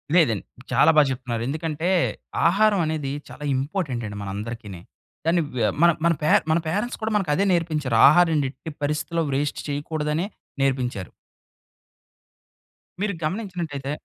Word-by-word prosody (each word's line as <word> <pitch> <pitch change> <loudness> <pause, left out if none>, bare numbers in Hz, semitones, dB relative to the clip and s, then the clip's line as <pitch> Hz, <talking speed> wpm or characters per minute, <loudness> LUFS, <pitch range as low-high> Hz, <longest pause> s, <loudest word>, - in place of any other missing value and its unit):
లేదండి 120 - +3 0.3
చాలా - - +5
బా - - +9
చెప్తున్నారు. 120 -3 -3
ఎందుకంటే 160 +3 -2 0.6
ఆహారం 205 +3 +3
అనేది 155 -3 -2 0.2
చాలా - - -10
ఇంపార్టెంట్ 140 -3 -2
అండి 105 0 -7
మన 100 - -5
అందరికిని. 105 -4 -6 0.4
కాని 170 +1 +3
వే 120 - 0 0.2
మన 170 - +8 0.2
మన 170 - +5
పే 150 - +1 0.2
మన 160 - +4
పేరెంట్స్ 205 +9 -2
కూడా 220 0 -1
మనకు 195 -7 +1
అదే 200 - +2
నేర్పించారు. 155 -7 0
ఆహారాన్ని 165 -5 +4
ఎట్టి 160 +3 -9
పరిస్థితిలో 150 +3 -1
వేస్ట్ 145 +2 -1
చేయకూడదనే 150 +3 -2 0.4
నేర్పించారు. 125 -8 -1 1.9
మీరు 205 -1 0
గమనించినటైతే 170 -7 -3
150 Hz, 130 wpm, -24 LUFS, 130-170 Hz, 1.9 s, బా